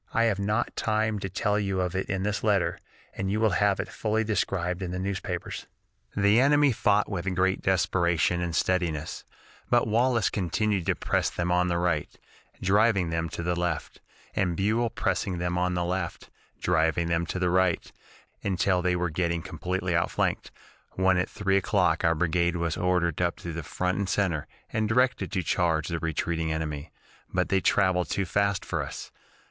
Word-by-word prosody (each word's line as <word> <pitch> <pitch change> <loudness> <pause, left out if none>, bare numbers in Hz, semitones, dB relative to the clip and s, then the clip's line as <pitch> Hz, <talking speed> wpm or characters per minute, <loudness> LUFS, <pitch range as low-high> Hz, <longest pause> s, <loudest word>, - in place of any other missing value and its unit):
I 115 - +4
have 110 -4 +1
not 105 +4 -1
time 110 -1 0
to 95 - -4
tell 105 +3 0
you 95 -2 -1
of 90 -1 -1
it 95 - -2
in 95 -1 -1
this 105 0 -1
letter, 105 -4 +1 0.3
and 95 0 -3
you 105 - 0
will 110 -1 +3
have 100 +1 +2
it - - -2
fully 110 0 -1
described 95 -4 -1
in 90 - -3
the 90 - -3
newspapers. 95 +1 -4 0.5
"The 100 +3 +5
enemy 145 +1 +5
fought 105 -2 +2
with 95 -1 -3
great 95 +1 +1
desperation 90 -3 +1
and 85 -2 -2
steadiness, 80 -3 -1 0.5
but 120 -1 +4
Wallace 115 +1 +2
continued 100 0 0
to - - +2
press - - 0
them 90 0 -2
on 90 0 +3
the 85 -1 0
right, 85 -4 0 0.5
driving 100 -2 +3
them 80 0 -1
to 85 - -5
the 90 0 0
left, 85 -3 -3 0.3
and 90 -3 0
Buell 110 +4 +1
pressing 95 -3 -1
them 90 0 -1
on 90 0 0
the 90 0 0
left, 90 -1 -3 0.3
driving 80 0 +2
them 85 0 0
to - - -3
the 90 -1 +1
right, 95 -1 +1 0.5
until 95 -1 +1
they 90 0 +1
were 90 -1 -1
getting 85 0 -1
completely 90 0 -2
outflanked, 85 - 0 0.4
when 95 0 +3
at 90 - -1
three 100 -2 +1
o'clock 90 -4 +2
our 80 0 +3
brigade 85 +2 +1
was 85 -2 -1
ordered 90 -3 +1
up 85 -1 +1
to 85 - -7
the 85 - -4
front 90 +5 -2
and 100 -2 -1
center, 90 -8 0 0.3
and 110 -1 0
directed 125 0 +2
to 95 -2 0
charge 80 -2 +1
the 85 -1 -2
retreating 80 0 -1
enemy, 80 -1 -4 0.4
but 90 0 0
they 95 -1 +2
traveled 95 -3 +2
too 100 - 0
fast 100 +1 0
for - - -2
us. - - -7
90 Hz, 185 wpm, -27 LUFS, 85-100 Hz, 0.5 s, The